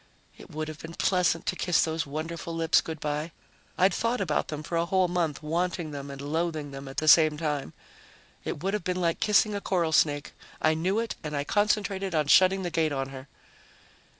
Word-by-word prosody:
It -, -, -14 dB
would 155 Hz, +1 st, -4 dB
have 155 Hz, -1 st, -8 dB
been 165 Hz, +1 st, -9 dB
pleasant 180 Hz, -3 st, +1 dB
to -, -, -1 dB
kiss 180 Hz, -2 st, +2 dB
those 160 Hz, -1 st, -2 dB
wonderful 165 Hz, +3 st, -5 dB
lips 165 Hz, 0 st, +3 dB
good 160 Hz, -1 st, -6 dB
by. 150 Hz, +2 st, -3 dB, 0.5 s
I'd 185 Hz, 0 st, +4 dB
thought 230 Hz, +5 st, 0 dB
about 165 Hz, -6 st, 0 dB
them 150 Hz, 0 st, -5 dB
for 170 Hz, -, -4 dB
a 170 Hz, +1 st, +1 dB
whole 190 Hz, -1 st, +2 dB
month, 170 Hz, -4 st, -1 dB
wanting 170 Hz, 0 st, -1 dB
them 140 Hz, -1 st, -6 dB
and 140 Hz, -1 st, -8 dB
loathing 155 Hz, 0 st, -2 dB
them 135 Hz, 0 st, -8 dB
at 135 Hz, -, -10 dB
the 155 Hz, -, -1 dB
same 155 Hz, -1 st, +6 dB
time. 150 Hz, -, -3 dB, 0.7 s
It 145 Hz, -, -5 dB
would 195 Hz, +1 st, 0 dB
have 210 Hz, -, -1 dB
been 180 Hz, +1 st, -1 dB
like 170 Hz, -2 st, 0 dB
kissing 210 Hz, 0 st, +3 dB
a 200 Hz, -, -3 dB
coral 175 Hz, -5 st, 0 dB
snake. 145 Hz, -2 st, +2 dB, 0.3 s
I 155 Hz, -, +3 dB
knew 180 Hz, +6 st, 0 dB
it 230 Hz, 0 st, -2 dB
and 150 Hz, -1 st, -3 dB
I 140 Hz, -, 0 dB
concentrated 200 Hz, 0 st, 0 dB
on 155 Hz, -1 st, +2 dB
shutting 190 Hz, +5 st, +5 dB
the 175 Hz, -, -3 dB
gate 160 Hz, -2 st, +1 dB
on 135 Hz, -1 st, -2 dB
her. 135 Hz, 0 st, -9 dB
165 Hz, 210 wpm, -27 LUFS, 150-180 Hz, 0.7 s, same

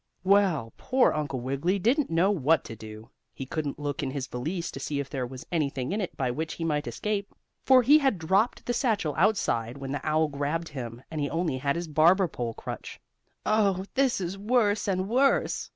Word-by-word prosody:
Well, 185 Hz, -, +3 dB
poor 260 Hz, 0 st, +2 dB
Uncle 145 Hz, -4 st, -3 dB
Wiggily 140 Hz, +9 st, 0 dB
didn't 250 Hz, -, +1 dB
know 170 Hz, +5 st, +3 dB
what 160 Hz, -5 st, +2 dB
to 115 Hz, -, -8 dB
do. 110 Hz, 0 st, -11 dB, 0.2 s
He 135 Hz, -, -5 dB
couldn't 145 Hz, +1 st, -3 dB
look 145 Hz, -1 st, -3 dB
in 140 Hz, -, -2 dB
his 135 Hz, -1 st, -3 dB
valise 165 Hz, +8 st, -4 dB
to -, -, -7 dB
see 140 Hz, +1 st, -3 dB
if 140 Hz, -, -5 dB
there 130 Hz, -3 st, -2 dB
was 130 Hz, +1 st, -9 dB
anything 140 Hz, -5 st, -1 dB
in 210 Hz, +2 st, -1 dB
it 185 Hz, -, -5 dB
by 130 Hz, -2 st, 0 dB
which 160 Hz, +5 st, -4 dB
he 165 Hz, -, -5 dB
might 150 Hz, -2 st, -1 dB
escape, 205 Hz, -1 st, -3 dB, 0.3 s
for 260 Hz, -1 st, +6 dB
he 290 Hz, +6 st, +7 dB
had 270 Hz, -8 st, +2 dB
dropped 190 Hz, +8 st, +1 dB
the 245 Hz, -, 0 dB
satchel 225 Hz, -, 0 dB
outside 140 Hz, -, +1 dB
when 135 Hz, -1 st, -6 dB
the 145 Hz, -1 st, -3 dB
owl 155 Hz, +1 st, +2 dB
grabbed 150 Hz, +3 st, -2 dB
him, 120 Hz, -3 st, -7 dB
and 155 Hz, -2 st, -3 dB
he 145 Hz, -, -1 dB
only 165 Hz, -6 st, -1 dB
had 140 Hz, +1 st, 0 dB
his 170 Hz, 0 st, -3 dB
barber 170 Hz, +5 st, +4 dB
pole 120 Hz, -7 st, -4 dB
crutch. -, -, -7 dB, 0.5 s
"Oh, 200 Hz, -3 st, +2 dB
this 265 Hz, -4 st, +2 dB
is 185 Hz, +1 st, -4 dB
worse 210 Hz, -1 st, +2 dB
and 185 Hz, -1 st, 0 dB
worse!" 265 Hz, +5 st, +2 dB
160 Hz, 205 wpm, -27 LUFS, 140-200 Hz, 0.5 s, he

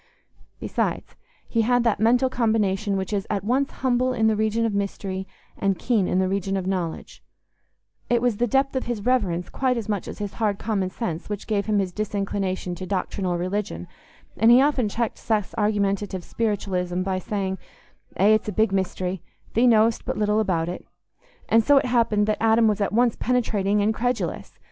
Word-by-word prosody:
Besides, -, -, -2 dB, 0.3 s
he 230 Hz, -, +1 dB
had 245 Hz, +2 st, +2 dB
that 230 Hz, -3 st, +1 dB
mental 245 Hz, +4 st, +4 dB
combination 215 Hz, -5 st, 0 dB
which 190 Hz, +2 st, -3 dB
is 200 Hz, 0 st, -1 dB
at 200 Hz, -2 st, -1 dB
once 260 Hz, +6 st, +1 dB
humble 255 Hz, 0 st, 0 dB
in 225 Hz, -3 st, +1 dB
the 220 Hz, -1 st, +3 dB
region 220 Hz, +2 st, +1 dB
of 225 Hz, -, -1 dB
mystery 195 Hz, -1 st, -3 dB, 0.3 s
and 195 Hz, -2 st, 0 dB
keen 215 Hz, -2 st, +1 dB
in -, -, 0 dB
the 190 Hz, 0 st, +2 dB
region 195 Hz, 0 st, -1 dB
of 190 Hz, -, -3 dB
knowledge: 180 Hz, -4 st, -4 dB, 0.9 s
it 240 Hz, -, +3 dB
was 240 Hz, -3 st, 0 dB
the 240 Hz, -, +1 dB
depth 270 Hz, +4 st, +1 dB
of 260 Hz, -, -1 dB
his 230 Hz, -4 st, -4 dB
reverence 190 Hz, -9 st, +1 dB
quite 255 Hz, -2 st, 0 dB
as 225 Hz, -, -4 dB
much 205 Hz, -3 st, -2 dB
as -, -, -7 dB
his 205 Hz, -1 st, -5 dB
hard 205 Hz, -2 st, +1 dB
common 195 Hz, -4 st, -1 dB
sense 180 Hz, -4 st, -5 dB
which 205 Hz, -1 st, -4 dB
gave 205 Hz, -2 st, -1 dB
him 210 Hz, -1 st, +2 dB
his 190 Hz, -2 st, 0 dB
disinclination 195 Hz, -2 st, -2 dB
to 185 Hz, +1 st, -7 dB
doctrinal 185 Hz, -1 st, -2 dB
religion, 180 Hz, -, -3 dB, 0.5 s
and 225 Hz, +5 st, +5 dB
he 240 Hz, +1 st, +8 dB
often 265 Hz, -5 st, +2 dB
checked 230 Hz, +2 st, -2 dB
Seth's 215 Hz, -4 st, -1 dB
argumentative 200 Hz, -3 st, 0 dB
spiritualism 185 Hz, -5 st, -2 dB
by 190 Hz, 0 st, -1 dB
saying, 190 Hz, -1 st, -3 dB, 0.6 s
"Eh, 200 Hz, +3 st, +4 dB
it's 215 Hz, 0 st, +1 dB
a -, -, -1 dB
big 220 Hz, +1 st, +2 dB
mystery; 190 Hz, -1 st, -2 dB, 0.3 s
thee 240 Hz, +3 st, +4 dB
know'st 225 Hz, -1 st, +4 dB
but -, -, -3 dB
little 210 Hz, 0 st, +2 dB
about 180 Hz, -6 st, 0 dB
it." 180 Hz, -, -5 dB, 0.6 s
And 225 Hz, 0 st, +4 dB
so 285 Hz, +3 st, +5 dB
it -, -, +3 dB
happened 230 Hz, -4 st, +2 dB
that 215 Hz, 0 st, -1 dB
Adam 225 Hz, 0 st, +4 dB
was 210 Hz, -1 st, +1 dB
at 200 Hz, -, 0 dB
once 235 Hz, +2 st, +2 dB
penetrating 210 Hz, -4 st, +1 dB
and 215 Hz, +2 st, +2 dB
credulous. 245 Hz, +2 st, -2 dB
210 Hz, 190 wpm, -24 LUFS, 190-230 Hz, 0.9 s, he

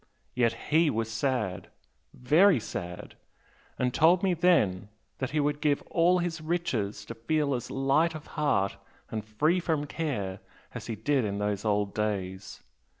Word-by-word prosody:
Yet 120 Hz, -2 st, +2 dB, 0.2 s
HE 160 Hz, +1 st, +5 dB
was 115 Hz, -3 st, -2 dB
sad! 115 Hz, -6 st, -1 dB, 0.4 s
very 155 Hz, +5 st, +4 dB
sad! 90 Hz, -5 st, -6 dB, 0.6 s
and 125 Hz, 0 st, 0 dB
told 170 Hz, +6 st, +4 dB
me 190 Hz, -2 st, +3 dB
then 110 Hz, -, +2 dB, 0.3 s
that 130 Hz, -, -2 dB
he 150 Hz, +2 st, -1 dB
would 145 Hz, 0 st, 0 dB
give 145 Hz, -2 st, +1 dB
all 175 Hz, +2 st, +4 dB
his 175 Hz, -2 st, -2 dB
riches 155 Hz, -, -2 dB
to -, -, -6 dB
feel 140 Hz, +5 st, 0 dB
as 120 Hz, -2 st, -4 dB
light 140 Hz, +5 st, +2 dB
of 155 Hz, -, -8 dB
heart 100 Hz, -11 st, +1 dB, 0.3 s
and 110 Hz, -1 st, -3 dB
free 150 Hz, -, +1 dB
from 160 Hz, -4 st, -1 dB
care 125 Hz, -, -3 dB, 0.3 s
as -, -, -7 dB
he 115 Hz, -, -3 dB
did 130 Hz, +5 st, +1 dB
in 100 Hz, -2 st, -2 dB
those 105 Hz, 0 st, -2 dB
old 105 Hz, -1 st, +1 dB
days! 95 Hz, -3 st, -3 dB
130 Hz, 155 wpm, -28 LUFS, 105-155 Hz, 0.6 s, HE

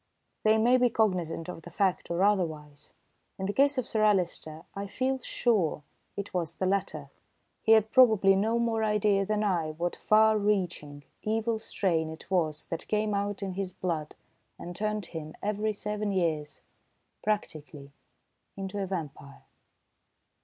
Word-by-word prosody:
They 215 Hz, 0 st, +4 dB
may 240 Hz, +3 st, +4 dB
be 245 Hz, -1 st, +3 dB
cognisant 180 Hz, -8 st, 0 dB
of 180 Hz, -2 st, -7 dB
the 175 Hz, -, -11 dB
fact 190 Hz, +1 st, 0 dB
or 170 Hz, +2 st, +1 dB
otherwise. 155 Hz, -8 st, -1 dB, 0.4 s
In 190 Hz, -, -3 dB
the 200 Hz, -, -1 dB
case 280 Hz, +3 st, +3 dB
of 255 Hz, -, -1 dB
Sir 215 Hz, -1 st, 0 dB
Alister 175 Hz, -6 st, +1 dB
I 200 Hz, 0 st, -5 dB
feel 260 Hz, +5 st, -1 dB
sure 210 Hz, -12 st, 0 dB, 0.3 s
it 200 Hz, 0 st, -5 dB
was 170 Hz, -4 st, -2 dB
the 185 Hz, -, -2 dB
latter. 160 Hz, -7 st, -1 dB, 0.5 s
He 225 Hz, -, +5 dB
had 220 Hz, -1 st, +4 dB
probably 220 Hz, -7 st, +6 dB
no 220 Hz, +4 st, +1 dB
more 230 Hz, -1 st, 0 dB
idea 210 Hz, -2 st, +2 dB
than 215 Hz, 0 st, 0 dB
I 170 Hz, -6 st, 0 dB
what 170 Hz, +2 st, -2 dB
far 220 Hz, 0 st, +4 dB
reaching, 175 Hz, -8 st, -1 dB, 0.2 s
evil 220 Hz, +1 st, 0 dB
strain 165 Hz, -7 st, -1 dB
it 160 Hz, +4 st, -11 dB
was 160 Hz, -5 st, 0 dB
that 165 Hz, -, -6 dB
came 210 Hz, 0 st, 0 dB
out 200 Hz, 0 st, -2 dB
in 190 Hz, -1 st, -3 dB
his 190 Hz, -1 st, -4 dB
blood 160 Hz, -4 st, -3 dB, 0.4 s
and 175 Hz, 0 st, -8 dB
turned 210 Hz, +1 st, -2 dB
him, 155 Hz, -2 st, -7 dB
every 210 Hz, +1 st, 0 dB
seven 210 Hz, 0 st, -3 dB
years, 160 Hz, -6 st, -1 dB, 0.6 s
practically 155 Hz, -9 st, -3 dB, 0.7 s
into 195 Hz, +1 st, -4 dB
a 195 Hz, -, -2 dB
vampire. 150 Hz, -6 st, -6 dB
195 Hz, 155 wpm, -29 LUFS, 165-215 Hz, 0.7 s, probably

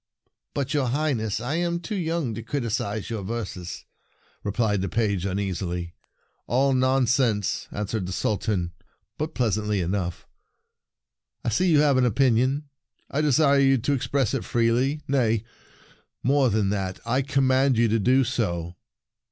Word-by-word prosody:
"But, 140 Hz, 0 st, -1 dB
your 140 Hz, -4 st, +1 dB
Highness, 120 Hz, -6 st, 0 dB
I 130 Hz, +7 st, -2 dB
am 170 Hz, 0 st, 0 dB
too 170 Hz, +5 st, -6 dB
young 165 Hz, -, -1 dB
to 115 Hz, -, -5 dB
criticize 115 Hz, -4 st, -3 dB
your 110 Hz, -3 st, -3 dB
verses," 95 Hz, -4 st, -5 dB, 0.6 s
replied 105 Hz, -1 st, 0 dB
the 95 Hz, -, -2 dB
page 100 Hz, -4 st, 0 dB
un 95 Hz, 0 st, -2 dB
easily. 90 Hz, -3 st, -3 dB, 0.5 s
"All 135 Hz, +3 st, +2 dB
nonsense," 130 Hz, -5 st, +1 dB
answered 105 Hz, -2 st, -3 dB
the -, -, -4 dB
Sultan, 95 Hz, -1 st, -1 dB, 0.5 s
but 155 Hz, +1 st, -3 dB
pleasantly 105 Hz, -3 st, 0 dB
enough. 90 Hz, -1 st, -2 dB, 0.7 s
" -, -, -37 dB
I -, -, +2 dB
see 180 Hz, -, +2 dB
you 150 Hz, -3 st, +5 dB
have 145 Hz, -3 st, +4 dB
an 130 Hz, -, +4 dB
opinion. 130 Hz, +4 st, +2 dB, 0.4 s
I 145 Hz, -, 0 dB
desire 145 Hz, -1 st, +4 dB
you 135 Hz, -1 st, +4 dB
to 135 Hz, +4 st, 0 dB
ex 135 Hz, -, -2 dB
press 135 Hz, -6 st, +1 dB
it -, -, -1 dB
freely. 120 Hz, +5 st, +1 dB
Nay, 115 Hz, -6 st, +1 dB, 0.8 s
more 135 Hz, 0 st, +3 dB
than 105 Hz, -2 st, +1 dB
that, 95 Hz, -2 st, -3 dB
I 125 Hz, +4 st, +1 dB
command 135 Hz, -1 st, +2 dB
you 115 Hz, 0 st, +4 dB
to 115 Hz, +1 st, +2 dB
do 130 Hz, +6 st, +4 dB
so." 90 Hz, -, -2 dB
120 Hz, 150 wpm, -25 LUFS, 105-135 Hz, 0.8 s, you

